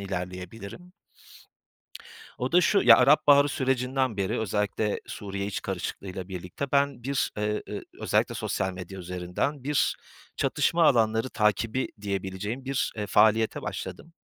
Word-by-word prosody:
ilerleyebilirim. 100 - -7 1.5
O 125 +1 -2
da 180 - +6
şu, 200 +2 +3
ya, - - +9
Arap 145 +4 +5
Baharı 145 0 +7
sürecinden 130 -3 0
beri 95 -2 -1
özellikle 105 0 -1
Suriye 100 -1 -5
iç 100 - -4
karışıklığıyla 95 -1 -5
birlikte 90 +9 -6
ben 140 -3 +2
bir 140 0 0
eee, 105 0 -1
ııı, - - -5 0.2
özellikle - - +1
sosyal 95 0 -2
medya 90 +1 -8
üzerinden, 90 - -3
bir 145 0 +1 0.4
çatışma 170 0 +2
alanları 115 -3 +3
takibi 110 +4 +1
diyebileceğim 100 +4 -4
bir, 135 0 -1
eee, 105 -1 -3
faaliyete 110 +1 +3
başladım. 95 - -6
110 Hz, 130 wpm, -27 LUFS, 95-135 Hz, 1.5 s, ya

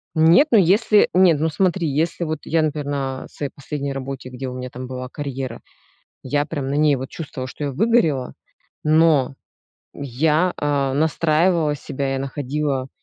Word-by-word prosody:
Нет, 165 - +6
ну 230 - +6
если 205 +3 +4
нет, 180 -4 +5
ну 160 - +1
смотри, 175 +1 0
если 160 +4 -1
вот 155 -1 -3
я, 165 0 +1
например, 150 -1 -1
на 135 -2 -3
своей 145 -2 -5
последней 140 -1 -4
работе, 135 -1 -6
где 130 +1 -6
у - - -7
меня 125 0 -6
там 125 +1 -7
была 130 0 -6
карьера, 135 -3 -5 0.6
я 145 +2 0
прям 145 -4 -4
на 140 - -2
ней 150 -1 +3
вот 130 0 -6
чувствовала, 140 -5 -6
что 145 - -6
я 140 - -2
выгорела, 165 - +1 0.5
но 155 -3 +3 0.6
я, 150 +6 +1
а, 140 -2 0
настраивала 160 +1 +2
себя, 135 -1 -4
я - - -1
находила, 135 0 -2
145 Hz, 165 wpm, -21 LUFS, 135-160 Hz, 0.6 s, Нет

